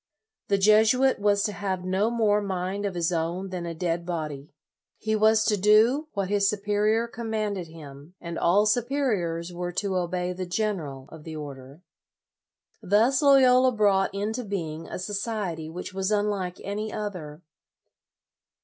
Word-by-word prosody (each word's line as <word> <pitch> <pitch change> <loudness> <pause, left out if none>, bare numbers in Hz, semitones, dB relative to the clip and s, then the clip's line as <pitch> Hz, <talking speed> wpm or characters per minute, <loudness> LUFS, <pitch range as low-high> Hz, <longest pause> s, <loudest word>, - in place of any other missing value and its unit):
The 200 - +2
Jesuit 220 +6 +4
was 205 -1 +2
to 210 - 0
have 190 -2 -3
no 190 +4 +1
more 215 -3 +2
mind 195 +1 -2
of 190 - -5
his 170 0 0
own 170 +3 -2
than 180 -2 -5
a 165 - -5
dead 170 0 -2
body. 155 -5 -5 0.5
He 220 0 -2
w 215 0 +4
7 - - +7
as 220 0 +2
to 210 - +2
do 220 +9 +4
what 200 -2 -1
his 200 0 +2
superior 210 +2 +1
commanded 215 -5 -3
him, 150 0 -12
and 170 -1 -6
LOYOLA - - -4
71 - - +2
all 200 +5 +4
superiors 210 -8 0
were 175 0 -4
to 195 0 -1
obey 180 0 -2
the 185 0 -5
general 175 -10 -3
of 160 -2 -11
the 160 0 -7
order. 140 +1 -9 1.0
Thus 230 +8 +3
Loyola 260 -2 +5
brought 200 -3 +2
into 215 +5 -3
being 165 -6 -5
a - - -6
so 185 +3 -5
ciety 195 -7 -3
which 180 +2 -7
was 190 0 -1
unlike 205 -3 -1
any 210 +2 -4
other. 175 -7 -6
195 Hz, 165 wpm, -26 LUFS, 175-215 Hz, 1.0 s, 7